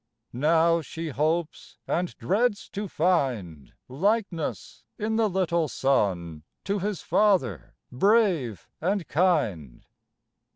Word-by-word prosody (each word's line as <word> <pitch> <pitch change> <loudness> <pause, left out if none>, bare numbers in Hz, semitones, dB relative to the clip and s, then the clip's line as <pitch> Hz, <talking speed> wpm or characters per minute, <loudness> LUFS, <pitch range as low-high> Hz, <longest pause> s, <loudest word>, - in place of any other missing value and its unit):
Now 165 +5 +3
she 165 +1 -6
hopes 155 +4 -2
and 175 +1 -2
dreads 205 +3 0
to 205 +1 -4
find 130 - -1 0.2
Likeness 185 - -2
in 220 +1 -1
the 220 -2 +2
little 170 -3 0
son 90 - 0 0.2
To 200 +1 -1
his 205 -1 -3
father, 180 - +1 0.2
brave 175 - +2
and 190 0 -1
kind. 125 - 0
165 Hz, 100 wpm, -26 LUFS, 130-195 Hz, 0.2 s, Now